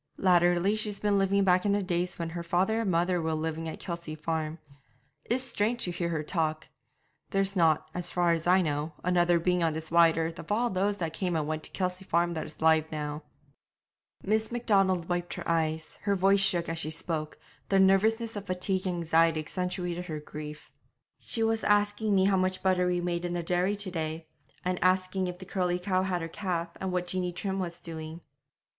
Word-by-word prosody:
Latterly 175 +2 +3
she's 215 -1 -1
been 205 -1 +2
living 195 +1 +2
back 180 -1 +4
in 205 - +2
the 205 0 +1
days 180 -1 -1
when 170 -1 -3
her 170 +1 -4
father 185 +6 +1
and 215 - -1
mother 175 0 +1
were 160 0 -1
living 160 +1 -3
at - - -7
Kelsey 170 -3 -5
Farm. 160 0 -3 0.7
It's 250 +2 0
strange 235 -1 -1
to 180 - -1
hear 170 0 -2
her 160 -2 -2
talk. 155 -1 -1 0.6
There's 195 0 0
not, 160 -4 +3
as 180 0 0
far 175 -1 +2
as 165 0 0
I 185 +1 +5
know, 150 0 -2
another 175 -1 +3
being 180 +1 +1
on 165 -2 +2
this 160 +1 -6
wide 170 -1 +5
earth 165 +1 -2
of - - -8
all 235 +3 +1
those 200 +2 0
that 165 -4 -3
came 180 -1 -1
and 155 -2 0
went 155 +1 -3
to - - -8
Kelsey 185 0 -3
Farm 170 -1 +1
that 160 - -4
is 155 - -12
alive 160 -1 +4
now.' 150 -1 -4 1.0
Miss 220 +2 0
Macdonald 195 -7 +2
wiped 175 0 -2
her - - -5
eyes; 160 -1 -1
her 200 -1 +1
voice 195 +1 +4
shook 180 -3 +3
as 165 0 -3
she 155 - -3
spoke; 155 -1 -3 0.3
the 195 - +4
nervousness 220 +4 +3
of 205 -1 -6
fatigue 185 +1 -1
and 180 - -1
anxiety 165 0 +3
accentuated 180 +2 -3
her 155 -3 -4
grief. 150 0 -9 0.5
'She 225 - -2
was 225 0 +1
asking 205 0 +2
me 190 0 +4
how 195 -1 +3
much 185 0 0
butter 185 -1 +3
we 180 -1 0
made 175 0 -2
in 175 0 -2
the 175 -1 -2
dairy 180 +4 +1
to 200 -2 -4
day, 160 -1 -3 0.4
and 180 -1 -1
asking 185 0 +2
if 180 0 -5
the 185 - -10
curly 180 -1 0
cow 185 0 0
had 180 -2 -1
her - - -3
calf, 170 -1 -3
and 190 -1 -3
what 180 0 -1
Jeanie 180 0 -2
Trim 190 +2 -3
was 170 -2 -4
doing.' 160 0 -7
180 Hz, 210 wpm, -29 LUFS, 165-190 Hz, 1.0 s, I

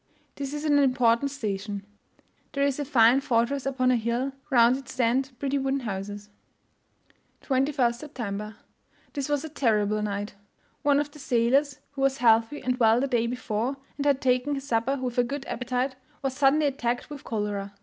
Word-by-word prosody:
This 280 -1 -5
is 295 +1 -4
an 290 -1 +4
important 255 -1 +3
station; 205 -6 -4 0.7
there 280 - +1
is 280 0 +1
a 290 - -2
fine 255 -1 +5
fortress 260 +1 0
upon 255 -2 +2
a - - +4
hill 235 +4 -1 0.2
round 240 -1 +5
it 270 -1 -8
stand 255 +2 +1
pretty 280 +1 -1
wooden 270 0 -1
houses. 205 -1 -5 1.1
21st 265 -2 +1
September. 220 -6 -6 0.6
This 280 -2 -3
was 290 +1 0
a - - -4
terrible 215 -7 +1
night! 205 0 -3 0.5
One 285 -1 +3
of 290 0 -2
the 300 - -14
sailors, 265 +2 +2
who 280 -1 -6
was 270 0 +2
healthy 230 +3 +3
and 250 0 -1
well 225 0 +5
the 275 - 0
day 235 -3 +1
before, 245 +1 -2 0.2
and 285 - -2
had 275 -1 +3
taken 255 +2 +1
his 275 0 -6
supper 235 +2 +1
with 250 -2 -2
a - - +5
good 275 +3 -4
appetite, 250 +2 -2 0.3
was 270 -1 -1
suddenly 285 +2 +3
attacked 245 -1 -2
with 290 -2 -8
cholera. 205 -3 -3
255 Hz, 175 wpm, -26 LUFS, 230-275 Hz, 1.1 s, fine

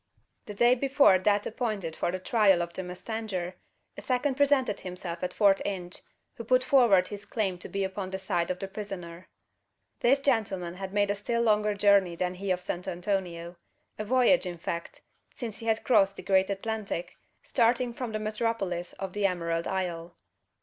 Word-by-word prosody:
The 210 - -7
day 240 +4 +5
before 270 -6 +4
that 205 +2 +2
appointed 215 -8 -3
for - - -1
the 185 - -2
trial 195 -2 +3
of 170 0 -7
the - - -3
mustanger, 185 0 -4 0.4
a - - -8
second 260 +2 0
presented 275 -6 +2
himself 180 -2 -6
at 180 - -1
Fort 200 -2 +4
Inge, 180 -3 -4 0.3
who 230 - -8
put 255 +3 +3
forward 240 -9 +4
his 205 -1 -7
claim 195 -5 -2
to - - -9
be 195 -1 -2
upon 190 0 -4
the 190 - -3
side 175 -3 -1
of 185 - -1
the 195 - -5
prisoner. 185 -4 -7 0.7
This 255 +4 +4
gentleman 215 -10 0
had 190 +1 -6
made 205 0 +2
a - - -1
still 235 +3 -1
longer 210 -2 +2
journey 200 -3 +4
than 180 +1 -1
he 195 +2 -5
of 180 -1 +1
San 180 -1 -3
Antonio; 175 -2 -3 0.4
a - - -1
voyage, 255 0 +3
in 175 -1 -5
fact: 170 +1 -5 0.3
since 225 -3 -6
he 230 - -7
had 220 0 +1
crossed 195 -6 +4
the - - -9
great 190 0 +3
Atlantic, 200 -3 -3 0.3
starting 240 +1 +2
from 240 -1 -5
the 215 - -2
metropolis 215 -5 -2
of 190 -1 -6
the 205 -1 +2
Emerald 170 -2 -2
Isle. 175 -3 -3
195 Hz, 185 wpm, -28 LUFS, 180-225 Hz, 0.7 s, day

